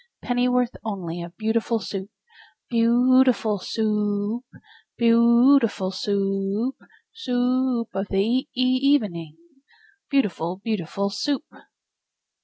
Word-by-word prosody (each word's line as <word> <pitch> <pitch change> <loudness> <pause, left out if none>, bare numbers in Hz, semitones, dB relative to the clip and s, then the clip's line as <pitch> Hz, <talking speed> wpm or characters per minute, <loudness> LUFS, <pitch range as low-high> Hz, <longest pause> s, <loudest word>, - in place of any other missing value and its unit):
Pennyworth 250 0 +1
only 175 -6 -5
of 170 0 -10
beautiful 225 +1 0
Soup? 195 -1 -6 0.6
Beau 240 +3 +4
ootiful 220 -6 0
Soo 225 - -3 0.5
oop! 250 - -16 0.5
Beau 235 +4 +5
ootiful 200 -6 -2
Soo 200 +2 -1 0.6
oop! - - -48 0.4
Soo 455 - -5 0.5
oop 230 - -10
of 195 +1 -3
the 195 - -2
e 255 +6 0
e 255 - +1 0.2
evening, 185 - 0 0.7
Beautiful, 185 - 0
beauti 210 -8 -2
FUL 200 0 -2
SOUP! 280 +7 -2
230 Hz, 115 wpm, -23 LUFS, 195-250 Hz, 0.7 s, Beau